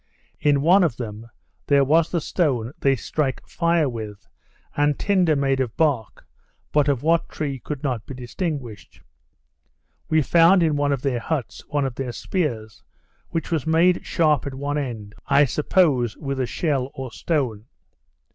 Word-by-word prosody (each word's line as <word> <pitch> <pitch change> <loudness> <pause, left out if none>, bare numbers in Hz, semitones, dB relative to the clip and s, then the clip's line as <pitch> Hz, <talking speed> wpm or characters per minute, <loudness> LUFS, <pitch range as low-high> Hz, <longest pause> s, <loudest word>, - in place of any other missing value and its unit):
In 145 -2 +2
one 180 +6 +5
of 150 -9 0
them 110 -1 -7 0.4
there 140 -1 +4
was 155 +4 +3
the 170 - -1
stone 135 -8 -1
they 135 -1 +3
strike 135 +2 -3
fire 170 -2 +1
with, 110 - -7 0.5
and 145 0 +2
tinder 185 -6 +2
made 135 -1 +1
of 125 -3 -2
bark, 140 -9 0 0.5
but 150 -1 +3
of 140 -3 0
what 165 +1 +2
tree 140 -4 -4
could 145 +2 -6
not 125 -6 -2
be 135 - -7
distinguished. 130 - -6 1.1
We 155 -1 +3
found 170 +4 +5
in 155 -2 +2
one 145 0 +1
of 135 -2 -2
their 130 -4 0
huts, 135 -4 -4
one 145 -2 0
of 130 - -3
their 125 -1 -4
spears, 115 - -3 0.5
which 165 +1 -3
was 160 -5 -1
made 170 +3 +3
sharp 155 -4 +1
at 135 - -5
one 145 +2 -2
end, 110 -7 -5
I 140 +1 +5
suppose, 140 - +1
with 140 -3 -4
a 130 - 0
shell 135 -5 -1
or 130 -2 -6
stone. 125 -8 -2
140 Hz, 165 wpm, -23 LUFS, 125-160 Hz, 1.1 s, one